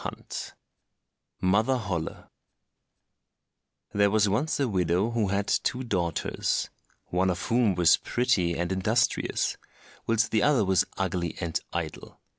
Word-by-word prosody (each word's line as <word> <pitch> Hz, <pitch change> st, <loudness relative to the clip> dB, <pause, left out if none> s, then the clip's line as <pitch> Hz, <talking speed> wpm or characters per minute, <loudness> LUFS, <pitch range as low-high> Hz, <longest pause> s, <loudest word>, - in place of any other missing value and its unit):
24 -, -, -7 dB, 0.8 s
Mother 105 Hz, +8 st, +2 dB
Holle 90 Hz, -8 st, -4 dB, 1.7 s
There 100 Hz, 0 st, +4 dB
was 105 Hz, 0 st, +3 dB
once 125 Hz, +12 st, 0 dB
a 140 Hz, -, +2 dB
widow 90 Hz, +1 st, +1 dB
who 115 Hz, -3 st, 0 dB
had 100 Hz, +1 st, 0 dB
two 130 Hz, +1 st, 0 dB
daughters—one 90 Hz, -1 st, -2 dB
of 90 Hz, -1 st, -2 dB
whom 115 Hz, -5 st, +2 dB
was 85 Hz, -1 st, +5 dB
pretty 110 Hz, -9 st, 0 dB
and 85 Hz, +2 st, -2 dB
industrious, 110 Hz, +5 st, +1 dB, 0.5 s
whilst 115 Hz, -1 st, +2 dB
the 110 Hz, -, +2 dB
other 140 Hz, -8 st, +3 dB
was 95 Hz, -2 st, +3 dB
ugly 90 Hz, -3 st, -2 dB
and 85 Hz, -1 st, -1 dB
idle. 85 Hz, -3 st, -5 dB
100 Hz, 120 wpm, -27 LUFS, 90-115 Hz, 1.7 s, was